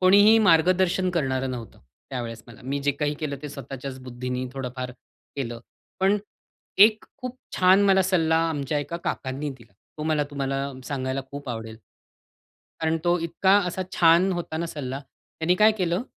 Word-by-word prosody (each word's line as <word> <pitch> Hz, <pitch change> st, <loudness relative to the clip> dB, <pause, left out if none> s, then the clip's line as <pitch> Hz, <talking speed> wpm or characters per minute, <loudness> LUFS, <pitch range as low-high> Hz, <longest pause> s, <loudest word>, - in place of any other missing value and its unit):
कोणीही 205 Hz, +4 st, +7 dB
मार्गदर्शन 180 Hz, +2 st, +4 dB
करणारं 135 Hz, -6 st, -1 dB
नव्हतं 120 Hz, -3 st, -7 dB, 0.3 s
त्यावेळेस 115 Hz, -3 st, -5 dB
मला. 115 Hz, -, -14 dB
मी 140 Hz, +2 st, -2 dB
जे 145 Hz, 0 st, +2 dB
काही 145 Hz, +1 st, -1 dB
केलं 145 Hz, -2 st, -2 dB
ते 150 Hz, -, -5 dB
स्वतःच्याच 135 Hz, 0 st, -7 dB
बुद्धीने 125 Hz, +1 st, -4 dB
थोडंफार 130 Hz, -1 st, -5 dB, 0.5 s
केलं. 120 Hz, -4 st, -4 dB, 0.4 s
पण 195 Hz, +2 st, +4 dB, 0.6 s
एक 215 Hz, +2 st, +6 dB
खूप 255 Hz, -1 st, -6 dB, 0.2 s
छान 185 Hz, +2 st, +6 dB
मला 190 Hz, -1 st, +5 dB
सल्ला 165 Hz, -4 st, +2 dB
आमच्या 145 Hz, -1 st, -1 dB
एका 145 Hz, +4 st, -4 dB
काकांनी 135 Hz, +2 st, -3 dB
दिला. 115 Hz, -6 st, -14 dB, 0.3 s
तो -, -, -3 dB
मला 155 Hz, -2 st, +1 dB
तुम्हाला 135 Hz, -1 st, -2 dB, 0.2 s
सांगायला 130 Hz, -1 st, -2 dB
खूप 140 Hz, -1 st, -7 dB
आवडेल. 110 Hz, -1 st, -5 dB, 1.0 s
कारण 160 Hz, 0 st, +1 dB
तो 175 Hz, +1 st, +3 dB
इतका 190 Hz, +4 st, +3 dB
असा 185 Hz, +1 st, -2 dB
छान 170 Hz, +3 st, +5 dB
होता 175 Hz, -2 st, -4 dB
ना 170 Hz, +1 st, -2 dB
सल्ला, 135 Hz, -3 st, -5 dB
त्यांनी 160 Hz, +5 st, -3 dB
काय 215 Hz, +2 st, +6 dB
केलं? 180 Hz, +2 st, 0 dB
150 Hz, 155 wpm, -25 LUFS, 130-180 Hz, 1.0 s, कोणीही